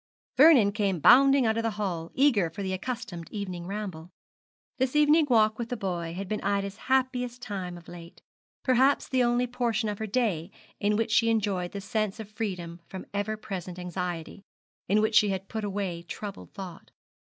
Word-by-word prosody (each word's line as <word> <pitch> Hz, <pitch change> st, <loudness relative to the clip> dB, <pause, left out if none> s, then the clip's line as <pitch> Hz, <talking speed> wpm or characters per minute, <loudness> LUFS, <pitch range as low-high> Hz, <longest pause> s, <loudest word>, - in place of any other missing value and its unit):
Vernon 270 Hz, -9 st, +7 dB
came 200 Hz, -3 st, 0 dB
bounding 270 Hz, -, +6 dB
out 220 Hz, 0 st, +1 dB
of -, -, +1 dB
the 225 Hz, -, 0 dB
hall, 175 Hz, -6 st, -3 dB
eager 240 Hz, -, +3 dB
for 200 Hz, +5 st, -6 dB
the 190 Hz, -1 st, -2 dB
accustomed 210 Hz, -5 st, -5 dB
evening 185 Hz, -4 st, -5 dB
ramble. 190 Hz, -5 st, -5 dB, 0.7 s
This 260 Hz, +2 st, 0 dB
evening 300 Hz, +1 st, +5 dB
walk 215 Hz, -2 st, +3 dB
with 235 Hz, -1 st, -3 dB
the 245 Hz, -, -3 dB
boy 175 Hz, -4 st, -3 dB
had 195 Hz, +1 st, -5 dB
been 210 Hz, +2 st, -2 dB
Ida's 200 Hz, 0 st, -1 dB
happiest 250 Hz, -2 st, 0 dB
time 185 Hz, -4 st, -5 dB
of 170 Hz, -, -15 dB
late, 170 Hz, -1 st, -11 dB, 0.4 s
perhaps 260 Hz, +2 st, +3 dB
the 260 Hz, -1 st, +1 dB
only 240 Hz, 0 st, +2 dB
portion 240 Hz, -2 st, -1 dB
of 205 Hz, -, -4 dB
her 220 Hz, -, -3 dB
day 200 Hz, -8 st, 0 dB, 0.3 s
in 210 Hz, +1 st, +1 dB
which 225 Hz, +1 st, 0 dB
she 230 Hz, -, +4 dB
had 230 Hz, -, +4 dB
enjoyed 195 Hz, -5 st, -1 dB
the 200 Hz, -, -6 dB
sense 215 Hz, +1 st, -2 dB
of 215 Hz, -1 st, -8 dB
freedom 180 Hz, -6 st, -5 dB
from 190 Hz, -, -8 dB
ever 205 Hz, +2 st, -2 dB
present 185 Hz, -4 st, -6 dB
anxiety, 180 Hz, 0 st, -5 dB, 0.5 s
in 210 Hz, +2 st, +4 dB
which 220 Hz, +1 st, +1 dB
she 210 Hz, -1 st, +5 dB
had 190 Hz, 0 st, -3 dB
put 220 Hz, -1 st, -4 dB
away 195 Hz, -4 st, -3 dB
troubled 200 Hz, +3 st, -8 dB
thought. 185 Hz, -4 st, -9 dB
205 Hz, 185 wpm, -28 LUFS, 185-235 Hz, 0.7 s, Vernon